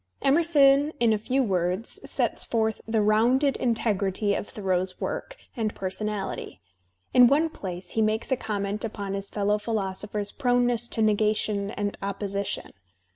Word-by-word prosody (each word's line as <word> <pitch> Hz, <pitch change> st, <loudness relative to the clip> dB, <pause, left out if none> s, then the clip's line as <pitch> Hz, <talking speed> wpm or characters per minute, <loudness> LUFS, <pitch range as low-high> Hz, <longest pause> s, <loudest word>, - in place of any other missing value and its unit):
Emerson 290 Hz, -1 st, +4 dB
in 230 Hz, -2 st, +4 dB
a -, -, +2 dB
few 260 Hz, +5 st, +1 dB
words 185 Hz, 0 st, -1 dB
s«ts -, -, 0 dB
forth 220 Hz, -1 st, -1 dB
the 220 Hz, -1 st, +1 dB
rounded 245 Hz, +7 st, +3 dB
integrity 205 Hz, -4 st, 0 dB
of 205 Hz, -, -3 dB
Thoreau's 185 Hz, -2 st, -2 dB
work -, -, -4 dB, 0.2 s
and 220 Hz, -4 st, -2 dB
personality; 195 Hz, +1 st, -4 dB, 0.5 s
in 250 Hz, -1 st, +8 dB
one 300 Hz, +5 st, +3 dB
place 185 Hz, -, -7 dB
Ift 220 Hz, -, +2 dB
makes 215 Hz, +4 st, -1 dB
a -, -, +4 dB
comment 205 Hz, -3 st, -2 dB
upon 205 Hz, -3 st, -4 dB
his 195 Hz, 0 st, -3 dB
fellow 205 Hz, 0 st, 0 dB
philosopher's 205 Hz, -1 st, -2 dB
proneness 245 Hz, -3 st, +1 dB
to 225 Hz, -, -1 dB
negation 210 Hz, -1 st, +1 dB
and 205 Hz, 0 st, -3 dB
opposition. 200 Hz, 0 st, -3 dB
215 Hz, 140 wpm, -26 LUFS, 200-240 Hz, 0.5 s, in